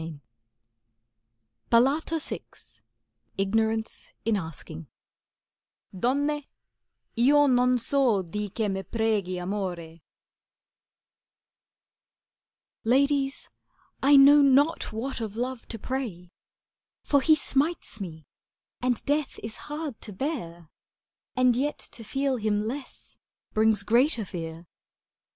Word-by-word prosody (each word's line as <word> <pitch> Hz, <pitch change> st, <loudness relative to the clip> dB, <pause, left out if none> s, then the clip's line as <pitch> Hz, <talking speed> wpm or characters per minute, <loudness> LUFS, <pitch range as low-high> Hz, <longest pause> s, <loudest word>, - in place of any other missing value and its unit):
90 160 Hz, -2 st, -7 dB, 2.0 s
CANZONIERE 320 Hz, -, -4 dB, 1.0 s
IGNORANCE 220 Hz, +3 st, -1 dB
IN 225 Hz, -1 st, +2 dB
ASKING 160 Hz, -3 st, -6 dB, 1.1 s
Donne, 285 Hz, +8 st, 0 dB, 0.7 s
io 285 Hz, +5 st, +5 dB
non 250 Hz, -1 st, +3 dB
so 245 Hz, -5 st, +2 dB
di 205 Hz, +4 st, -4 dB
che 215 Hz, +2 st, -2 dB
ml 195 Hz, -1 st, -2 dB
fregh'i 210 Hz, -5 st, -1 dB
Amort 175 Hz, -4 st, -4 dB, 2.8 s
Ladies, 275 Hz, +3 st, +1 dB, 0.5 s
I 285 Hz, +2 st, +6 dB
know 285 Hz, +2 st, +8 dB
not 285 Hz, +4 st, +3 dB
what 235 Hz, +3 st, -4 dB
of 215 Hz, -2 st, -5 dB
Love 250 Hz, 0 st, -4 dB
to 225 Hz, -, -5 dB
pray, 215 Hz, -8 st, -5 dB, 0.7 s
For 285 Hz, -2 st, +3 dB
he 315 Hz, +2 st, +5 dB
smites 290 Hz, -5 st, -1 dB
me, 160 Hz, -5 st, -7 dB, 0.6 s
and 250 Hz, -1 st, 0 dB
death 290 Hz, 0 st, 0 dB
is 220 Hz, 0 st, -4 dB
hard 295 Hz, -5 st, -5 dB
to 210 Hz, -, -7 dB
bear, 175 Hz, -, -5 dB, 0.6 s
And 255 Hz, -1 st, +4 dB
yet 285 Hz, +4 st, -1 dB
to 230 Hz, -, -10 dB
feel 270 Hz, +3 st, -1 dB
him 210 Hz, -1 st, 0 dB
less 260 Hz, +4 st, -7 dB, 0.4 s
brings 215 Hz, -1 st, +3 dB
greater 235 Hz, +1 st, +3 dB
fear. 165 Hz, -1 st, -7 dB
230 Hz, 100 wpm, -27 LUFS, 195-275 Hz, 2.8 s, know